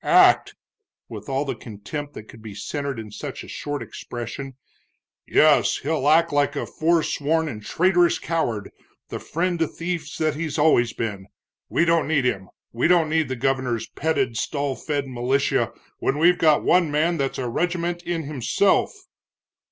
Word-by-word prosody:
"Act!" - - +5 0.5
with - - -8
all 135 +2 0
the 140 - -2
contempt 135 +7 -7
that - - -7
could 115 - -14
be 110 -2 -9
centered 140 +6 -4
in 110 -2 -7
such - - -7
a - - -12
short 145 0 -4
expression 125 +3 -7 0.7
"yes, - - +4
he'll 145 -1 0
act 165 0 +4
like 145 0 +2
a - - -2
forsworn 160 -1 +1
and 110 -7 -6
traitorous 175 - +3
coward, 120 -11 -2 0.4
the - - -5
friend 175 +2 -2
to 165 - +2
thieves 170 +1 -5
that 155 -1 +1
he's 155 0 -4
always 145 -6 +4
been! 100 -4 -4 0.4
We 170 - +2
don't 165 -4 +2
need 150 -4 +1
him, 95 -7 -1 0.2
we 120 +5 +2
don't 170 -3 +3
need 160 -2 +2
the 130 - -3
governor's 130 -3 -1
petted, 135 -7 -1
stall 140 +3 -2
fed 145 -1 -3
militia, 130 +2 0 0.3
when 135 - 0
we've 175 +3 +4
got 155 -2 +4
one 175 -3 +3
man 160 +4 +1
that's 135 -2 -2
a 130 - -2
regiment 175 +6 -1
in 175 -2 -3
himself!" 150 - +1
145 Hz, 165 wpm, -23 LUFS, 125-165 Hz, 0.7 s, Act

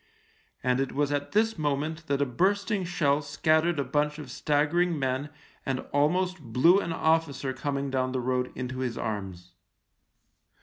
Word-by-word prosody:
And 125 +1 +2
it 135 - -1
was 145 +1 0
at 145 0 -2
this 220 -2 +1
moment 155 +2 -2
that 140 0 +1
a - - 0
bursting 195 - 0
shell 150 -5 +1
scattered 155 +3 +1
a 140 - +1
bunch 150 +3 0
of 145 -5 -8
staggering 155 +5 +1
men 135 +1 -1 0.3
and 130 -1 -2
almost 180 +6 +2
blew 135 - +4
an 170 - -3
officer 160 -4 +1
coming 140 +1 -3
down 130 -1 0
the 130 - -1
road 125 0 -1
into 130 0 -4
his 125 -3 -2
arms. 95 -5 -5
145 Hz, 160 wpm, -28 LUFS, 130-160 Hz, 0.3 s, blew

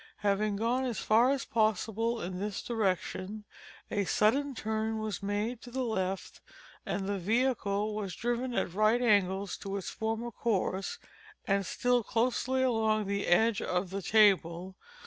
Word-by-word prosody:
Having 205 0 +1
gone 235 +5 0
as 240 -4 -2
far 230 +4 +4
as 275 -2 0
possible 225 -1 0
in 180 +1 -4
this 205 0 -3
direction, 210 -1 -2 0.5
a 205 - +1
sudden 270 +9 +2
turn 220 0 -2
was 215 -2 -3
made 210 +4 -2
to 245 - -10
the 260 +2 -2
left, 190 -5 -3 0.5
and 195 - -2
the 200 0 -2
vehicle 215 -1 0
was 205 -3 -4
driven 240 +2 -1
at 175 - -1
right 215 +4 +3
angles 200 -3 +2
to 200 0 -4
its 195 - -5
former 225 +2 -3
course, 195 -4 -1 0.5
and 195 -2 +1
still 245 +4 +2
closely 255 +3 0
along 220 -4 +2
the 200 +1 -2
edge 215 +5 +3
of 180 0 -1
the 195 +1 -3
table. 190 -3 +3
215 Hz, 150 wpm, -30 LUFS, 195-235 Hz, 0.5 s, far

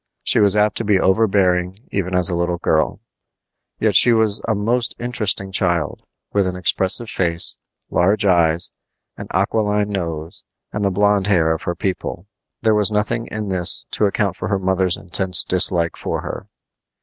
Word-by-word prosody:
She - - +3
was 100 -1 +4
apt 105 0 +2
to - - -1
be 100 -3 +2
overbearing 95 -3 +2
even 95 -2 -2
as 90 -2 +4
a 90 - 0
little 85 0 -1
girl. 80 -2 0 0.8
Yet - - 0
she 120 - +6
was 110 -2 +2
a 110 - +1
most 115 +4 0
interesting 110 -5 -1
child, 85 -5 -1 0.3
with 100 -2 +2
an 90 - -3
expressive 95 +5 +1
face, 85 -5 0 0.3
large 100 +4 +2
eyes, 85 -2 +2 0.5
an - - -8
aquiline 105 +2 0
nose, 85 -4 -5 0.3
and 105 - -2
the 100 - +2
blond 100 +1 +2
hair 85 -5 +3
of 80 - -5
her 85 - -3
people. 95 -1 -4 0.4
There 110 -1 +3
was 105 0 +4
nothing 105 +2 -1
in 105 -1 -5
this 90 -2 -2
to 105 - +1
account 100 -2 -1
for - - -5
her 100 - 0
mother's 95 -1 0
intense 90 +1 0
dislike 90 -2 +1
for - - -4
her. - - -7
95 Hz, 170 wpm, -19 LUFS, 90-105 Hz, 0.8 s, she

